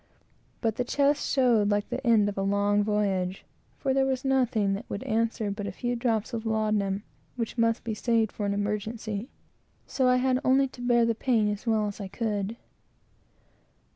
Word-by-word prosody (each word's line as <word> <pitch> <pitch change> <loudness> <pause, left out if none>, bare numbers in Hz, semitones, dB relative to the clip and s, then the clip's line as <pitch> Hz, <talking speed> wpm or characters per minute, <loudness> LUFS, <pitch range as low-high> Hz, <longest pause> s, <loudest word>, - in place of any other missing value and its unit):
But 225 -2 0
the 250 - +1
chest 285 +3 +1
showed 240 -6 +3
like 205 0 0
the 250 +2 -4
end 220 -3 +5
of 205 - -3
a 195 - -2
long 200 +1 +2
voyage, 195 -3 -1 0.3
for 270 - 0
there 270 0 +2
was 265 0 -2
nothing 245 -7 +2
that 205 +5 -6
would 200 - -4
answer 225 -1 0
but 205 0 -4
a - - -3
few 245 +5 -2
drops 230 -1 -1
of 225 -1 -3
laudanum, 215 -3 0 0.3
which 230 -3 -3
must 230 -1 +1
be 225 - -3
saved 225 0 +1
for 205 - -4
any 200 - 0
emergency; 210 +2 -3 0.6
so 260 -2 0
I 250 - +5
had 255 0 +2
only 270 +1 +4
to 245 - -12
bear 240 -1 +3
the 230 - +2
pain 225 -2 +1
as 205 +3 -6
well 220 -2 +2
as 205 0 -5
I 195 - -4
could. 210 +1 -3
220 Hz, 190 wpm, -27 LUFS, 205-245 Hz, 0.6 s, end